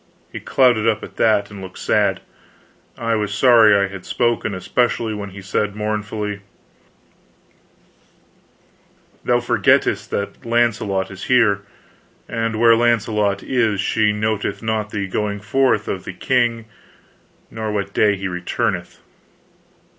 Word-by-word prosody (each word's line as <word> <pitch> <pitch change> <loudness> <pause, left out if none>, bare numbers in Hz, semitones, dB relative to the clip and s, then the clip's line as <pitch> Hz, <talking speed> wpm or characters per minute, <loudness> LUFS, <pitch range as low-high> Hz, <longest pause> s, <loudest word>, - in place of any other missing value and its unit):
He - - -6
clouded 120 -4 +2
up 110 -1 +1
at - - -11
that 105 -2 +2
and 100 -1 -9
looked 95 -1 -10
sad. - - +1 0.8
I 115 0 -1
was 105 -2 -1
sorry 115 -3 +6
I 100 0 +1
had 95 -2 -9
spoken, 120 -4 -1
especially 115 +3 0
when 100 -1 -6
he 95 0 -11
said 100 +1 -1
mournfully: 105 -1 -3 2.8
"Thou 120 0 +2
forgettest 120 -4 +2
that 100 - -4
Launcelot 115 -5 0
is 95 0 -8
here; 115 -6 +3 0.7
and 115 -1 -2
where 115 0 +6
Launcelot 110 -4 +1
is, 115 -6 0
she 105 +1 +2
noteth 105 0 -2
not 110 -1 -1
the 100 -2 -3
going 105 +2 -2
forth 110 +1 +1
of 95 - -3
the 95 - -7
king, 120 0 0 0.9
nor 110 -1 -4
what 100 -1 -3
day 105 -1 +3
he 100 0 -4
returneth." 90 -1 -3
105 Hz, 130 wpm, -20 LUFS, 100-115 Hz, 2.8 s, sorry